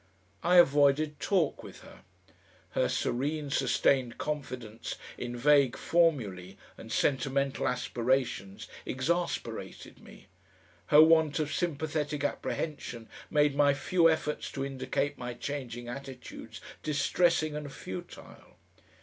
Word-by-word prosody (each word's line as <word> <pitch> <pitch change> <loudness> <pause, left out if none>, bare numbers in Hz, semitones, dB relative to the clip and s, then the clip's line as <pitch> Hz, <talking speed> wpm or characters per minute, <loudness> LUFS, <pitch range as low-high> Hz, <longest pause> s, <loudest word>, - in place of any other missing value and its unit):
I 175 +2 +3
avoided 150 -2 +4
talk 180 -7 +1
with - - -12
her. - - -15 0.7
Her - - +1
serene, 145 +3 -1
sustained 130 -2 +2
confidence 130 -7 -5 0.2
in 120 0 -5
vague 140 0 +4
formulae 110 - +1 0.2
and 110 - -11
sentimental 135 +1 0
aspirations 120 -5 -1 0.2
exasperated 170 +7 -3
me; - - -15 0.6
her 150 +1 +8
want 160 -2 +4
of 150 -2 -1
sympathetic 155 -3 -2
apprehension 130 -6 -3 0.2
made 150 -1 +3
my 145 0 +4
few 165 +4 +3
efforts 155 -2 -1
to 135 -1 -2
indicate 135 +1 -2
my 125 -1 -5
changing 120 -3 -5
attitudes 125 -3 -8 0.2
distressing 155 +1 +1
and 150 -2 -5
futile. 95 -8 -10
140 Hz, 105 wpm, -30 LUFS, 125-150 Hz, 0.7 s, her